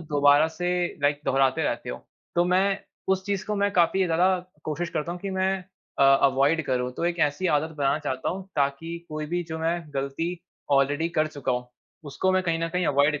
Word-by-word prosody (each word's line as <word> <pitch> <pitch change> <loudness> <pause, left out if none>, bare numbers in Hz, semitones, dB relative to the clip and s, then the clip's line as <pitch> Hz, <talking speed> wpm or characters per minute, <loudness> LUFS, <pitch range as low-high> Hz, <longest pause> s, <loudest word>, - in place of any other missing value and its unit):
दोबारा 145 -1 +4
से 175 +2 -3 0.3
लाइक 145 0 +2
दोहराते 135 -1 +2
रहते - - -2
हो। - - -5 0.4
तो 175 - +3
मैं 190 +2 +2 0.3
उस 190 0 -1
चीज़ 200 -1 -1
को 210 - -1
मैं 200 0 +2
काफ़ी 185 +1 +3
ज़्यादा 180 +2 +3 0.3
कोशिश 165 +3 -2
करता 155 +3 -2
हूँ, 180 - -6
कि 200 - -4
मैं 190 0 0 0.3
अ, - - +4 0.2
अवॉइड 140 +4 +3
करूँ। 125 -1 0
तो 170 - -4
एक 175 0 0
ऐसी 185 +6 -3
आदत 160 0 +1
बनाना 140 +1 +1
चाहता 130 -4 -3
हूँ, 190 +1 -5
ताकि 145 +4 -1
कोई 155 0 -4
भी 175 +2 -1
जो 160 - -4
मैं 165 +2 0
गलती 140 +4 -2 0.5
ऑलरेडी 145 +4 +2
कर 155 -2 +1
चुका 145 -4 -3
हूँ 125 0 -3 0.4
उसको 185 +7 0
मैं 185 0 +2
कहीं 165 -2 0
न 165 0 -1
कहीं 180 0 -1
अवॉइड 145 +1 +3
160 Hz, 205 wpm, -26 LUFS, 145-180 Hz, 0.5 s, दोबारा